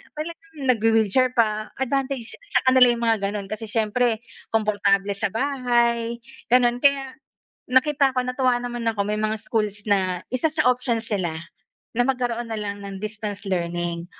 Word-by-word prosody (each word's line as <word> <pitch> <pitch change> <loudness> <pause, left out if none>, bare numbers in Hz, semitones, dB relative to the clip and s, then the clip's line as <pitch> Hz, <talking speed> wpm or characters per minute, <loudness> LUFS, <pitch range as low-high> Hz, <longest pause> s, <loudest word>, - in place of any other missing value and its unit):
talagang 325 +1 -7
nagwe-wheelchair 225 +1 +3
pa. 215 -2 +1
Advantage 265 -2 -1 0.2
sa - - +4
kanila 260 -1 +7
yung 235 0 -4
mga 225 -1 +3
ganun 200 0 -3
kasi 215 +2 -5
siyempre, 225 +1 0 0.3
komportable 205 -2 +2
sa 215 - 0
bahay, 235 -1 +1 0.3
ganun. 240 0 +4
Kaya 275 -1 +2 0.6
nakita 275 +2 +4
ko, 255 -1 -1
natuwa 250 -1 +1
naman 240 -1 -5
ako, 220 -2 -4
may 210 - 0
mga 215 0 0
schools 210 -1 -2
na 190 -3 +1 0.2
isa 285 +5 +1
sa 305 - 0
options 245 -2 +1
nila 170 -5 -2 0.6
na 245 - +3
magkaroon 240 -3 -1
na - - -3
lang 200 -1 -5
ng 195 -1 -7
distance 215 -1 -5
learning 170 -1 -2
230 Hz, 150 wpm, -23 LUFS, 210-250 Hz, 0.6 s, kanila